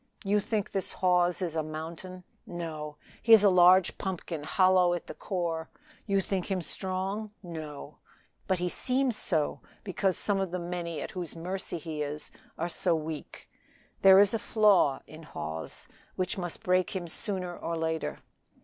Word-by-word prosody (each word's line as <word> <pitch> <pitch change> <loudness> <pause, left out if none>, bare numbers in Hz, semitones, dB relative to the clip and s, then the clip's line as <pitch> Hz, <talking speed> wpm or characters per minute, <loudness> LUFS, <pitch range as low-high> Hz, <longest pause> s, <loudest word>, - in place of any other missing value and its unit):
You 205 +1 +2
think 210 0 -2
this 195 - -1
Hawes 180 0 +2
is 165 -3 -3
a 160 - +1
mountain; 165 +4 -7 0.2
no! 155 -4 -5 0.3
he 230 - +6
is 215 -2 +9
a 200 - +6
large 180 0 +6
pumpkin 180 -4 -4
hollow 185 0 +4
at 175 - -6
the - - -7
core. 170 -4 -3 0.4
You 195 -1 +3
think 190 -1 -2
him 185 -3 -1
strong; 190 +4 -1
no! 155 -4 -8
he - - -33 0.2
but 175 - -1
seems 255 -2 0
so, 160 -7 -1 0.2
because 190 -1 0
some 200 -2 0
of 195 -1 -1
the 180 - -3
many 170 -2 -4
at - - -6
whose 175 -3 -5
mercy 180 +2 -4
he 160 -2 -5
is 150 +1 -4 0.3
are 170 - -1
so 175 +1 +1
weak. 155 -1 -6 0.5
There 190 -1 +9
is 200 +1 +6
a 225 - +1
flaw 205 -13 +3
in 155 +1 -12
Hawes, 80 - -6 0.3
which 185 +4 -1
must 175 -4 -4
break 185 +1 +2
him 175 -2 -3
sooner 180 0 -2
or 165 0 -3
later. 160 -1 -2
180 Hz, 165 wpm, -29 LUFS, 160-190 Hz, 0.5 s, is